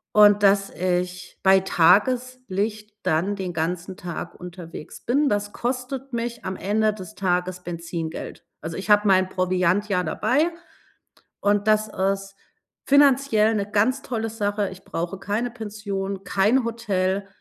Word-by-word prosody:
Und 205 -1 +7
dass 195 0 +4
ich 180 0 -2
bei 190 0 +6
Tageslicht 210 +2 +1
dann 185 +6 0
den 185 -2 -4
ganzen 175 +3 -3
Tag 175 -1 -6
unterwegs 175 -3 -9
bin, 280 +5 +2
das 205 -2 -1
kostet 255 +2 -4
mich 235 0 -4
am 190 0 -3
Ende 215 +2 +1
des 185 -5 -10
Tages 180 -1 -1
Benzingeld. 170 -1 -6 0.2
Also, 160 +2 -6
ich 195 +3 -5
habe 210 0 +5
meinen 185 -1 +4
Proviant 185 +2 +1
ja 180 -3 +1
dabei 270 - +1 0.9
und 205 +1 +2
das 215 0 +3
ist 195 0 -2 0.5
finanziell 275 -6 +4
'ne 205 -1 -2
ganz 235 +6 +2
tolle 225 -3 -3
Sache. 205 -2 -1
Ich 190 0 -12
brauche 175 +3 -4
keine 215 +5 -2
Pension, 200 -4 -5
kein 210 +6 +2
Hotel 200 -4 -1
200 Hz, 140 wpm, -24 LUFS, 185-220 Hz, 0.9 s, Und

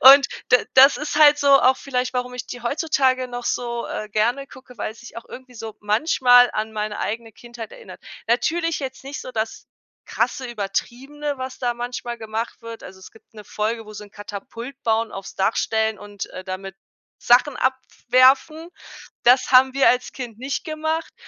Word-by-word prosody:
Und 275 +1 +9 0.2
da 250 - +6 0.2
das 270 +2 +8
ist 295 0 -4
halt 295 -1 +7
so 285 - +1
auch 260 +1 +4
vielleicht, 255 -2 -2
warum 250 0 -3
ich 250 - -6
die 245 - -8
heutzutage 260 -1 +1
noch 245 0 -6
so, 235 -1 -2
äh, 215 - -5
gerne 235 +6 0
gucke, 260 -3 -15
weil 215 - -3
es 220 - -17
sich 240 - -13
auch 230 - -8
irgendwie 255 -1 -12
so 220 -2 -8
manchmal 245 +2 +4
an 215 +1 -3
meine 210 -1 -3
eigene 225 +1 -4
Kindheit 235 0 -10
erinnert. - - -12 0.3
Natürlich 330 +7 +1
jetzt 265 -2 -6
nicht 280 +2 -6
so 255 - -9
das 220 -1 -4 0.4
krasse, 260 - -1
übertriebene, 255 +7 -4
was 260 0 -6
da 245 -2 -1
manchmal 240 0 -5
gemacht 225 +1 -5
wird. 230 0 -9
Also, 190 0 -12
es - - -13
gibt 220 - -23
'ne 210 - -10
Folge, 220 +3 -3
wo 215 - -10
sie 210 0 -9
'n 205 - -17
Katapult 230 +6 -9
bauen, 225 0 +1
aufs 195 0 -8
Dach 195 +3 0
stellen 220 -1 0
und, 205 -1 -7
äh, 185 - -10
damit 190 0 -7 0.4
Sachen 250 +3 +3
abwerfen. 260 +4 +2 0.6
Das 255 +2 +4
haben 260 0 +6
wir 275 0 +5
als 250 0 0
Kind 240 -5 -7
nicht 270 +2 -3
gemacht, 315 +1 -3
245 Hz, 185 wpm, -22 LUFS, 220-265 Hz, 0.6 s, Und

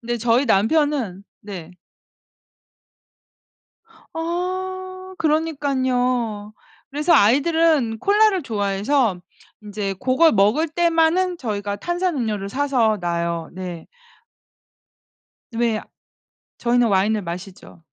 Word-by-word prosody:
근데 240 0 -3
저희 240 +4 +2
남편은 225 - +1 0.2
네. 180 -4 -9 2.4
아 370 +2 -4
그러니깐요. 255 -8 0 0.4
그래서 300 +5 +1
아이들은 285 0 +3
콜라를 410 - +3
좋아해서 205 -1 0 0.4
인제 205 -2 -4
고걸 310 +6 +4
먹을 215 +11 +3
때만은 340 +2 +2
저희가 205 -5 -3
탄산음료를 260 - -2
사서 245 -3 +1
놔요. 170 -1 -2
네. 180 -2 -7 1.7
왜 230 -1 0
아 - - -9 0.8
저희는 240 0 +2
와인을 205 +1 +2
마시죠. 180 0 -9
240 Hz, 205 characters per minute, -21 LUFS, 205-320 Hz, 2.4 s, 고걸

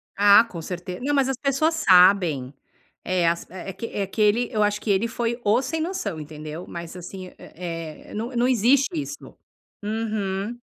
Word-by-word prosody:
Ah, 205 +2 +7
com 170 -5 -7
certe 180 +2 -6
não, 280 +3 -1
mas 275 -2 +2
as 265 - -1
pessoas 290 +4 +1
sabem. 180 - +4 0.5
É, 180 -2 +1
as 170 0 -1
é 185 +1 -7
que 210 - -6
é 200 - -2
que 215 - -3
ele 220 +3 +3
eu 215 - 0
acho 210 0 0
que - - -5
ele 200 +3 +2
foi 235 +1 -2
o 215 +5 +3
sem 320 +5 -3
noção, 315 - -3
entendeu. 155 +2 -8
Mas 170 0 -7
assim, 185 +1 -8
hã, - - -20
eh, 165 -3 -8
não 235 +4 -4
não 240 +1 +3
existe 255 +3 +3
isso. 295 -2 -6 0.5
Uhum. 215 0 -2
205 Hz, 185 wpm, -24 LUFS, 180-240 Hz, 0.5 s, Ah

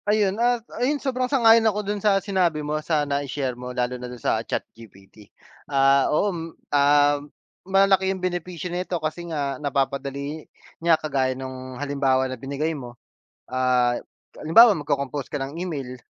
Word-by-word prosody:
Ayun 210 -2 +3
at 240 -1 +1 0.2
ayun 285 +4 +2
sobrang 255 -2 -2
sang-ayon 230 -4 +6
ako 210 0 -3
dun 205 0 -3
sa 205 -1 +3
sinabi 180 -6 0
mo 150 - -2
sa 150 -1 0
nai-share 140 -2 -2
mo 125 +1 -8
lalo 125 0 -2
na 125 - -6
dun 125 - -8
sa - - 0
ChatGPT. 105 -2 -8 0.4
Ah, 135 -1 +4
oo, 200 +6 +1
m 170 - -5 0.3
um, 145 0 +3 0.4
malalaki 195 0 +4
yung 190 - -1
benepisyo 180 -1 -4
nito 180 0 -2
kasi 165 +2 -4
nga, 140 -4 -3
napapadali 140 +1 -2 0.4
niya 165 -1 +4
kagaya 135 -4 -1
nung 130 -1 -7
halimbawa 135 -2 +1
na 130 - -4
binigay 140 +5 -3
mo, 120 -5 -9 0.5
ah, 125 -1 +2 0.4
halimbawa 210 +7 +6
mag-cocompose 140 -2 -3
ka 145 - -2
ng 135 +4 -5
email, 145 -8 -5
145 Hz, 155 wpm, -24 LUFS, 130-185 Hz, 0.5 s, sang-ayon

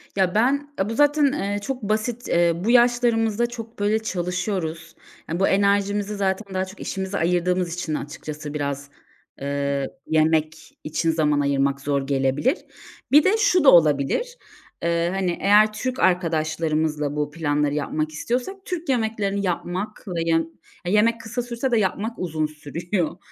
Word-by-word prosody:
Ya 190 -1 +1
ben, 280 +6 +1
aaa, 195 +2 0
bu - - -2
zaten, 290 +1 +4
eee, 205 -6 -2
çok 265 +4 -4
basit, 220 +3 -2
eee, 170 0 +3
bu 190 +7 0
yaşlarımızda 240 -2 +3
çok 230 -2 -9
böyle 210 +2 +2
çalışıyoruz. 180 -5 -3 0.3
Aaa, 170 +3 -3
bu 195 - +3
enerjimizi 200 +1 +1
zaten 195 0 -2
daha 185 - 0
çok 190 +2 -13
işimize 190 +1 -3
ayırdığımız 180 0 +1
için 175 -3 -3
açıkçası 150 0 -6
biraz, 140 -1 -3 0.5
eee, 140 0 -1 0.2
yemek 155 0 0
için 160 +2 0
zaman 150 -2 +1
ayırmak 140 -1 +1
zor 140 -1 -1
gelebilir. 135 - +1 0.5
Bir 295 +1 +7
de 395 +4 +3
şu 400 -6 +3
da 275 - +8
olabilir. 160 - +3 0.5
Eee, 170 0 +1
hani, 185 -3 -1
eğer 210 +2 +5
Türk 255 +4 -3
arkadaşlarımızla 160 -4 0
bu 150 0 -2
planları 150 -2 0
yapmak 155 +1 -2
istiyorsak 245 - -2
Türk 345 -4 -4
yemeklerini 220 -5 0
yapmak 185 +4 -3
ve 175 -3 -2
yem 165 0 +2 0.4
yemek 225 +4 +3
kısa 235 +2 -3
sürse 240 +2 -3
de 235 - +3
yapmak 215 +3 -1
uzun 160 -3 -1
sürüyor. 160 +4 -3
185 Hz, 150 wpm, -23 LUFS, 155-220 Hz, 0.5 s, da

